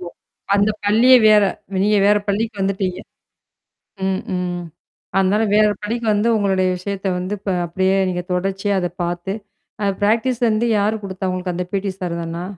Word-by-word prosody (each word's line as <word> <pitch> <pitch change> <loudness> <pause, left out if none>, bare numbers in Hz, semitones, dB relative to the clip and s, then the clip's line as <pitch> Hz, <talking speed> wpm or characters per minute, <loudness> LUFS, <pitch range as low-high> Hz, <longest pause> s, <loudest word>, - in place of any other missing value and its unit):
ஆமா. 175 -1 -7 0.4
அந்த 205 +1 +3
பள்ளியே 235 +5 +6
வேற 210 -1 +6 0.4
நீங்க 210 0 +3
வேற 210 - +5
பள்ளிக்கு 215 +1 -1
வந்துட்டீங்க. 190 -2 -1 1.1
ம், 190 0 0 0.2
ம். 180 -1 -3 0.6
அதனால, 195 +3 +2
வேற 215 0 +5 0.2
பள்ளிக்கு 230 +2 -3
வந்து 210 +3 +1
உங்களுடைய 190 -2 +1
விஷயத்த 195 +1 -4
வந்து 185 +3 -3
ப - - -2 0.2
அப்படியே 190 +3 +1
நீங்க 180 -1 -2
தொடர்ச்சியா 195 +2 -1
அத 175 - -1 0.2
பார்த்து 175 +2 -3 0.5
அ - - +1 0.2
பிராக்டிஸ் 230 +4 +1
வந்து 220 +2 +1
யார் 215 +2 0
குடுத்தா 190 -1 -4
உங்களுக்கு 180 -1 -3
அந்த 180 - -3
பீடி 195 0 -1
சார் 170 -2 -3
தானா? 165 +1 -5
195 Hz, 155 wpm, -20 LUFS, 185-210 Hz, 1.1 s, பள்ளியே